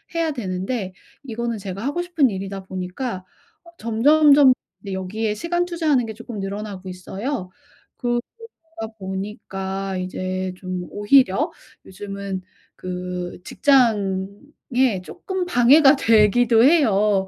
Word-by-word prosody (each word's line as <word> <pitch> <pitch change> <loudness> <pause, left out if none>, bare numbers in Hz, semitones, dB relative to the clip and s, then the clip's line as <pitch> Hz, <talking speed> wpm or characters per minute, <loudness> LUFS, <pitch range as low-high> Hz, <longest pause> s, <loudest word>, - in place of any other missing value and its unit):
해야 330 -2 +1
되는데 190 -3 -3 0.3
이거는 235 -2 -3
제가 195 +2 -6
하고 290 +5 -1
싶은 330 -7 +2
일이다 195 0 -5
보니까 185 +2 -5 0.4
어 340 - -16
점점점 280 +4 +5 0.3
네, 195 -2 -6
여기에 210 +3 -2
시간 345 +7 -1
투자하는 315 -8 +1
게 220 - -5
쪼끔 230 -1 -8
늘어나고 195 -1 -5
있어요. 190 +4 -5 0.5
그러다 240 -1 0 0.8
보니까 195 0 -4
이제 185 0 -3
좀 185 -1 -5
오히려 205 0 +3 0.3
요즘은 195 0 -6 0.3
그 180 -1 -5
직장에 225 -1 +1
쪼끔 375 - -4
방해가 275 -1 +6
되기도 225 +1 +4
해요. 210 - +4
210 Hz, 255 characters per minute, -22 LUFS, 190-260 Hz, 0.8 s, 방해가